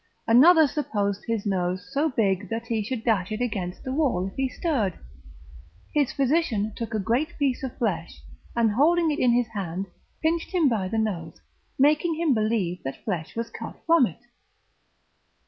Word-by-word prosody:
Another 315 Hz, +8 st, +7 dB
supposed 205 Hz, -9 st, -2 dB
his 225 Hz, -3 st, -1 dB
nose 185 Hz, -1 st, -1 dB
so 300 Hz, +3 st, +2 dB
big 200 Hz, -6 st, 0 dB
that 230 Hz, +1 st, -3 dB
he 225 Hz, -2 st, -1 dB
should 225 Hz, +1 st, -4 dB
dash 210 Hz, -5 st, +1 dB
it 215 Hz, -, -2 dB
against 195 Hz, -7 st, -3 dB
the 260 Hz, -, -3 dB
wall 265 Hz, -, +1 dB
if 195 Hz, -, -8 dB
he 265 Hz, -1 st, -1 dB
stirred; 250 Hz, -, -1 dB, 1.0 s
his 290 Hz, -4 st, +2 dB
physician 265 Hz, -7 st, +1 dB
took 230 Hz, -1 st, -4 dB
a -, -, +1 dB
great 250 Hz, -, -1 dB
piece 275 Hz, -4 st, 0 dB
of 265 Hz, -2 st, -5 dB
flesh, 170 Hz, -, -3 dB, 0.3 s
and 230 Hz, -2 st, +3 dB
holding 320 Hz, +7 st, +3 dB
it 295 Hz, -, -2 dB
in 250 Hz, -, +4 dB
his 240 Hz, -1 st, +1 dB
hand, 190 Hz, -3 st, -4 dB, 0.4 s
pinched 335 Hz, +3 st, 0 dB
him 335 Hz, -5 st, +4 dB
by 215 Hz, -7 st, 0 dB
the 225 Hz, +4 st, -2 dB
nose, 175 Hz, -7 st, -2 dB, 0.4 s
making 305 Hz, +4 st, +3 dB
him 320 Hz, -3 st, +2 dB
believe 215 Hz, -6 st, 0 dB
that 135 Hz, -, -7 dB
flesh 175 Hz, -7 st, -3 dB
was 230 Hz, 0 st, -4 dB
cut -, -, -8 dB
from 330 Hz, -7 st, +5 dB
it. 180 Hz, -, -12 dB
230 Hz, 175 wpm, -25 LUFS, 200-280 Hz, 1.0 s, Another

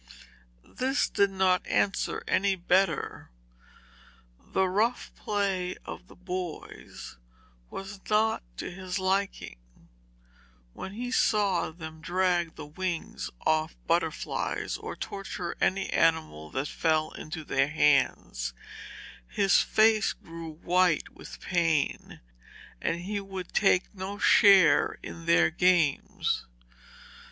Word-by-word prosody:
This 265 Hz, +2 st, 0 dB
did 200 Hz, 0 st, +2 dB
not 190 Hz, -1 st, +1 dB
answer 200 Hz, -, 0 dB
any 200 Hz, -1 st, +2 dB
better. 180 Hz, -2 st, 0 dB, 1.1 s
The 190 Hz, -, 0 dB
rough 215 Hz, +6 st, 0 dB
play 195 Hz, -3 st, -1 dB
of 180 Hz, -, -8 dB
the -, -, -16 dB
boys 180 Hz, -, -7 dB, 0.5 s
was 195 Hz, 0 st, -8 dB
not 215 Hz, +1 st, +2 dB, 0.2 s
to -, -, -5 dB
his 185 Hz, +1 st, -5 dB
liking. 190 Hz, -, -1 dB, 1.1 s
When 190 Hz, -, -7 dB
he 245 Hz, +3 st, -5 dB
saw 205 Hz, -7 st, +2 dB
them 160 Hz, -1 st, -10 dB
drag 175 Hz, -1 st, 0 dB
the -, -, -8 dB
wings 170 Hz, +3 st, -4 dB, 0.2 s
off 155 Hz, +1 st, +1 dB
butterflies, 165 Hz, -1 st, -1 dB
or -, -, -6 dB
torture 185 Hz, -3 st, -5 dB
any 190 Hz, 0 st, +1 dB
animal 160 Hz, -, +1 dB
that 130 Hz, -, -2 dB
fell 155 Hz, -1 st, 0 dB
into 155 Hz, +1 st, -7 dB
their 135 Hz, -2 st, +1 dB
hands, 65 Hz, -, +1 dB, 0.7 s
his 195 Hz, -1 st, +3 dB
face 215 Hz, -1 st, +3 dB
grew 165 Hz, 0 st, -9 dB
white 175 Hz, +1 st, +1 dB
with -, -, -12 dB
pain, 165 Hz, -5 st, 0 dB, 0.6 s
and 170 Hz, +1 st, -1 dB
he 205 Hz, +3 st, -3 dB
would 190 Hz, -2 st, -7 dB
take 195 Hz, -2 st, +2 dB
no 195 Hz, +1 st, -6 dB
share 200 Hz, -5 st, +5 dB
in 85 Hz, 0 st, -9 dB
their 85 Hz, -1 st, +4 dB
games. 175 Hz, -6 st, +1 dB
180 Hz, 110 wpm, -28 LUFS, 160-195 Hz, 1.1 s, share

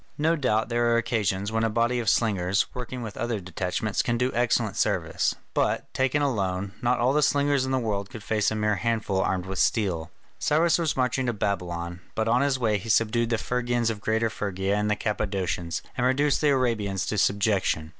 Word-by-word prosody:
No 160 Hz, +3 st, +2 dB
doubt 120 Hz, -7 st, 0 dB
there 120 Hz, 0 st, +2 dB
are 115 Hz, -, +4 dB
occasions 105 Hz, -4 st, -1 dB
when 110 Hz, 0 st, 0 dB
a 115 Hz, -, +2 dB
body 120 Hz, +2 st, +1 dB
of 115 Hz, -4 st, +1 dB
slingers, 100 Hz, -3 st, +2 dB
working 125 Hz, 0 st, -5 dB
with 110 Hz, -3 st, -7 dB
other 115 Hz, -2 st, -2 dB
detachments, 95 Hz, +5 st, -2 dB
can 120 Hz, -4 st, -1 dB
do 125 Hz, +2 st, +1 dB
excellent 120 Hz, 0 st, +1 dB
service, -, -, 0 dB, 0.2 s
but, -, -, 0 dB
taken 135 Hz, +3 st, +1 dB
alone, 100 Hz, -7 st, -1 dB
not 120 Hz, 0 st, +2 dB
all 125 Hz, +3 st, +2 dB
the 150 Hz, -, +3 dB
slingers 140 Hz, -1 st, +2 dB
in -, -, -2 dB
the 130 Hz, -, +2 dB
world 100 Hz, -5 st, -2 dB
could 110 Hz, -, -9 dB
face 105 Hz, -2 st, +1 dB
a 110 Hz, -, -3 dB
mere 105 Hz, -1 st, +1 dB
handful 110 Hz, -3 st, 0 dB
armed 95 Hz, -1 st, -1 dB
with 95 Hz, 0 st, -4 dB
steel. 90 Hz, -8 st, +1 dB, 0.3 s
Cyrus 165 Hz, +3 st, +3 dB
was 160 Hz, -5 st, 0 dB
marching 130 Hz, 0 st, 0 dB
to 120 Hz, -, +1 dB
Babylon, 90 Hz, -4 st, -3 dB, 0.2 s
but 110 Hz, 0 st, 0 dB
on 120 Hz, +3 st, +3 dB
his 140 Hz, -1 st, +2 dB
way 110 Hz, -5 st, +1 dB
he 115 Hz, -, -8 dB
subdued 115 Hz, +2 st, +2 dB
the 115 Hz, -, +1 dB
Phrygians 120 Hz, 0 st, 0 dB
of 105 Hz, -2 st, -7 dB
Greater 110 Hz, +1 st, 0 dB
Phrygia 100 Hz, 0 st, -2 dB
and 105 Hz, 0 st, 0 dB
the 105 Hz, -, +2 dB
Cappadocians, 95 Hz, -5 st, -2 dB
and 125 Hz, -, -1 dB
reduced 135 Hz, +3 st, +2 dB
the 150 Hz, -, +3 dB
Arabians 115 Hz, -8 st, 0 dB
to 105 Hz, -, -1 dB
subjection. 100 Hz, -6 st, +1 dB
110 Hz, 205 wpm, -26 LUFS, 100-125 Hz, 0.3 s, are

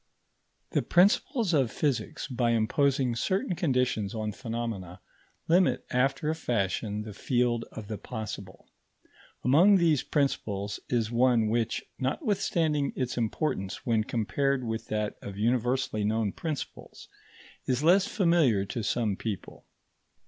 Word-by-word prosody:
The -, -, +2 dB
principles 200 Hz, -, +3 dB
of 135 Hz, -6 st, +3 dB
physics, 145 Hz, -5 st, -2 dB
by 120 Hz, -3 st, +1 dB
imposing 130 Hz, +2 st, +1 dB
certain 190 Hz, -, 0 dB
conditions 125 Hz, -, 0 dB
on 110 Hz, -1 st, -2 dB
phenomena, 115 Hz, -6 st, -5 dB, 0.5 s
limit 175 Hz, +2 st, +3 dB
after 135 Hz, +4 st, +1 dB
a -, -, 0 dB
fashion 105 Hz, -, -1 dB
the 105 Hz, -1 st, -8 dB
field 120 Hz, +1 st, 0 dB
of 110 Hz, -2 st, -8 dB
the 105 Hz, -2 st, -5 dB
possible. 105 Hz, -5 st, -7 dB, 0.8 s
Among 170 Hz, +11 st, +6 dB
these 165 Hz, -5 st, +3 dB
principles 105 Hz, -8 st, -1 dB
is 115 Hz, -2 st, 0 dB
one 120 Hz, -2 st, +3 dB
which, 115 Hz, 0 st, -1 dB
notwithstanding 155 Hz, -, 0 dB
its 125 Hz, -1 st, -2 dB
importance 110 Hz, -4 st, -2 dB
when 115 Hz, -3 st, +2 dB
compared 130 Hz, +5 st, 0 dB
with 110 Hz, -1 st, -4 dB
that 105 Hz, -1 st, -2 dB
of 100 Hz, -1 st, -8 dB
universally 120 Hz, 0 st, 0 dB
known 110 Hz, 0 st, 0 dB
principles, 155 Hz, -, -6 dB, 0.6 s
is 130 Hz, +2 st, 0 dB
less 185 Hz, +4 st, +5 dB
familiar 170 Hz, -, +3 dB
to 115 Hz, -, -4 dB
some 110 Hz, -1 st, 0 dB
people. 105 Hz, -1 st, -6 dB
120 Hz, 125 wpm, -28 LUFS, 110-145 Hz, 0.8 s, Among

